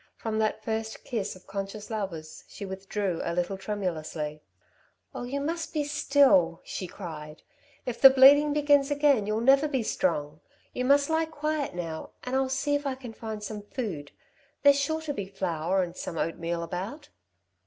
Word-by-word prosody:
From 220 -1 -2
that 215 0 0
first 220 0 -3
kiss 215 -7 -3
of 185 - -16
conscious 200 +2 -6
lovers 175 -8 -5
she 200 - -8
withdrew 190 -1 -3
a 170 - -2
little 180 +2 -1
tremulously. 165 -6 -4 0.7
"Oh, - - -5
you 275 +3 -3
must 325 +4 -3
be 300 - +2
still," 280 - +4
she 185 - -5
cried. 155 -5 -8 0.4
"If 245 -2 -4
the 270 - +12
bleeding 280 +3 +7
begins 290 -1 +3
again 285 -7 +3
you'll 215 +1 0
never 275 +4 +5
be 265 -5 -1
strong. 150 - -1 0.3
You 250 - -2
must 280 +3 +4
lie 320 0 +2
quiet 305 - -2
now, 165 -3 -5
and 250 +1 -3
I'll 265 0 +1
see 270 +2 0
if 290 0 0
I 265 - -1
can 250 -3 -9
find 220 -2 -6
some 210 0 -5
food. 200 - -5 0.5
There's 285 0 +6
sure 315 +3 -1
to 310 -2 -3
be 200 -7 -4
flour 185 -1 -1
and 175 0 -6
some 165 - -5
oatmeal 170 +1 -2
about." 190 - -6
220 Hz, 175 wpm, -28 LUFS, 180-280 Hz, 0.7 s, the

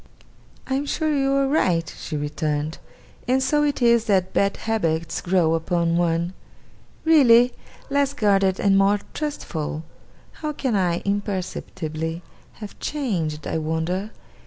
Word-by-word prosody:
'I 265 - -3
am 275 +2 0
sure 310 0 0
you 270 -1 +1
are 275 0 +2
right,' 175 - +1
she 155 - -5
returned; 150 +1 -2 0.5
'and 260 +1 +2
so 295 +2 +2
it 285 -3 0
is 235 -1 +4
that 190 -3 +1
bad 200 0 +1
habits 165 -8 -1
grow 175 -3 +2
upon 170 0 0
one! 170 +1 +1 0.7
Really? 250 -6 +6 0.4
Less 280 0 +1
guarded 195 -4 +2
and 195 -1 +4
more 200 +1 +3
trustful? 160 - -4 0.6
How 305 -1 -2
can 260 -6 -1
I, 175 -3 +1
imperceptibly, 180 -5 -3 0.3
have 210 -2 -10
changed, 175 - -2
I 160 - -1
wonder! 160 +6 -2
195 Hz, 135 wpm, -23 LUFS, 165-255 Hz, 0.7 s, Really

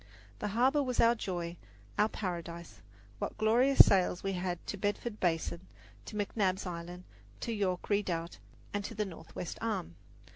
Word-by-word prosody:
The - - -1
harbour 255 +8 +3
was 255 -3 -1
our 230 0 +7
joy, 175 -6 -4 0.4
our 215 - +3
paradise. 170 -4 -5 0.4
What - - -3
glorious 245 +5 +7
sails 180 -2 +2
we 195 0 0
had 180 -1 -1
to - - -3
Bedford 205 +3 -2
Basin, 170 +1 0 0.4
to - - -8
McNabb's 200 -2 0
Island, 175 0 -6 0.4
to 230 - -2
York 190 -4 -1
Redoubt, 180 -5 -1 0.3
and 205 0 -1
to 225 - -6
the 210 0 0
Northwest 170 -1 -7
Arm! 210 - -2
195 Hz, 150 wpm, -32 LUFS, 175-215 Hz, 0.4 s, our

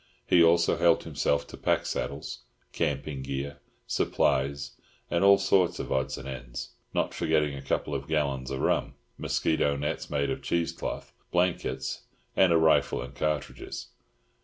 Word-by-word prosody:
He 85 - +6
also 85 +1 +4
helped 85 0 +4
himself 70 0 0
to - - -10
pack - - +1
saddles, 70 -4 -3 0.3
camping 70 -3 -2
gear, 70 +1 -4 0.3
supplies, 70 0 +1 0.4
and 85 +2 +2
all 100 0 +8
sorts 90 -3 +3
of - - -5
odds 65 0 0
and 65 - -8
ends—not 65 -2 -4
forgetting 75 -2 +1
a 70 - -7
couple 70 +2 -1
of 70 0 -3
gallons 70 -5 0
of 65 0 -3
rum, - - +1 0.2
mosquito 75 -3 +1
nets 75 +1 -3
made 70 -1 0
of - - -3
cheese 85 -1 0
cloth, - - -5 0.2
blankets, 85 -7 0 0.3
and 95 -2 +5
a 85 - +6
rifle 80 -1 +3
and 60 +2 -6
cartridges. 75 0 -3
70 Hz, 150 wpm, -28 LUFS, 70-80 Hz, 0.4 s, all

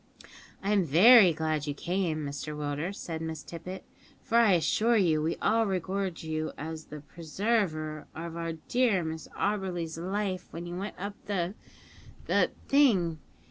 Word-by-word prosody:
"I'm 200 -1 +3
very 185 - +8
glad 155 -1 -1
you 145 - -2
came, 170 -3 -1
Mr 145 +2 -5
Willders," 150 +6 -3
said 160 -2 -5
Miss 160 -2 -5
Tippet, 180 +3 -8 0.4
"for 230 - +3
I 225 -5 +5
assure 220 +7 +3
you 165 -6 +3
we 160 +2 0
all 225 0 +3
regard 190 -1 -2
you 155 0 -3
as 160 +1 -6
the 150 -1 -9
preserver 160 -2 -2
of 165 +1 -6
our 165 -1 -3
dear 205 +3 +1
Miss 160 -1 -5
Auberly's 180 -5 -2
life 190 +1 -2
when 170 +1 -7
you 175 0 -6
went 195 +3 -5
up 200 +2 -4
the 185 -3 -1 0.7
the - - +3 0.2
thing. 195 - +3
170 Hz, 150 wpm, -29 LUFS, 160-200 Hz, 0.7 s, very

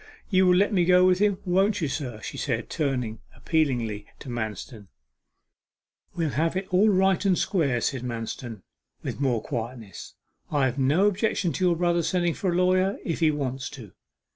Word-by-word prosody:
'You 185 -1 +4
will 180 - +5
let 200 +3 +2
me 180 -3 +3
go 180 +1 +5
with 185 0 +3
him, 205 -2 +2
won't 190 +3 +2
you, 160 - 0
sir?' 125 -6 -5
she 110 - -6
said, 120 -4 -3
turning 125 -8 -2 0.2
appealingly 120 -10 -1
to 135 - -10
Manston. 110 -1 -5 1.3
'We'll 165 -4 -1
have 160 +7 0
it 190 - -2
all 200 +4 +5
right 190 -1 +3
and 190 -3 +2
square,' 140 - 0
said 130 0 -1
Manston, 115 -3 -6 0.4
with - - -5
more 125 -5 +1
quietness. 115 -4 -6 0.3
'I 145 -3 +2
have 130 +1 -2
no 145 +9 +3
objection 200 -4 0
to 185 - 0
your 175 -1 +3
brother 175 0 +1
sending 175 0 0
for 185 +2 -1
a - - -1
lawyer, 185 +2 +2
if 165 - -2
he 160 -2 +4
wants 135 -2 -3
to. 110 -7 -11
155 Hz, 180 wpm, -26 LUFS, 125-185 Hz, 1.3 s, will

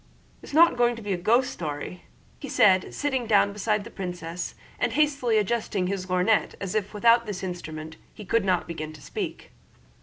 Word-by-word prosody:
"It's - - -11
not 325 -1 +5
going 240 0 +3
to 230 - -9
be 205 -1 -1
a - - +1
ghost 230 +8 +2
story?" 155 +2 -6 0.4
said 185 -2 +4
he, - - -11
sitting 265 -5 -1
down 205 -2 +4
beside 210 0 0
the - - -11
princess 175 -2 -5 0.2
and - - 0
hastily 280 -7 +2
adjusting 210 -3 0
his 185 0 -3
lorgnette, 185 +4 +2
as 195 -2 -4
if 210 0 -2
without 235 +2 +4
this 195 -2 -5
instrument 160 -3 -6
he 210 - -11
could 230 +3 +2
not 185 -2 +1
begin 155 -2 -5
to 155 - -13
speak. - - -5
200 Hz, 185 wpm, -26 LUFS, 180-230 Hz, 0.4 s, not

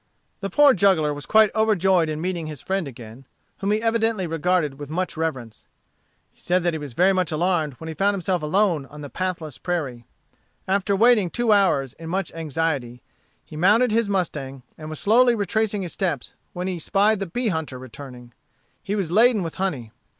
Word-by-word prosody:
The 195 - -4
poor 285 +7 +6
juggler 180 -8 +3
was 145 -1 -8
quite 220 -1 +5
overjoyed 190 -6 +2
in 155 0 -3
meeting 175 -2 -3
his 150 -3 -7
friend 190 0 -2
again, 120 0 -11 0.3
whom 200 - -2
he 215 +2 +1
evidently 225 -3 +1
regarded 165 -3 0
with 145 -1 -7
much 180 +4 -2
reverence. 130 -9 -4 0.6
He - - -28
said 180 0 +1
that 175 -1 +1
he 160 - -3
was 145 -4 -8
very 185 +8 +3
much 185 -3 0
alarmed 160 -2 0
when 160 +6 -10
he 160 - -4
found 200 +6 +1
himself 180 -2 -1
alone 165 -2 +1
on 150 +1 -11
the 145 - -8
pathless 170 -6 -4
prairie. 135 -10 -3 0.6
After 200 +1 +1
waiting 220 -3 +4
two 240 +4 0
hours 180 - +3
in 165 0 -9
much 190 -1 -2
anxiety, 145 -6 -3 0.4
he - - -12
mounted 210 +9 +4
his 225 -1 +1
mustang, 135 -9 -3
and 155 -1 -9
was 155 - -5
slowly 240 +3 +4
retracing 210 0 -1
his 175 - -5
steps, 170 -10 -3 0.2
when 180 +1 -4
he 185 -2 -3
spied 205 +5 +2
the 195 - -3
bee 235 +7 -1
hunter 160 -7 -3
returning. 125 -1 -11 0.5
He 200 - -3
was 190 -6 -2
laden 220 +1 +4
with 165 - -5
honey. 135 - -2
175 Hz, 190 wpm, -23 LUFS, 150-200 Hz, 0.6 s, poor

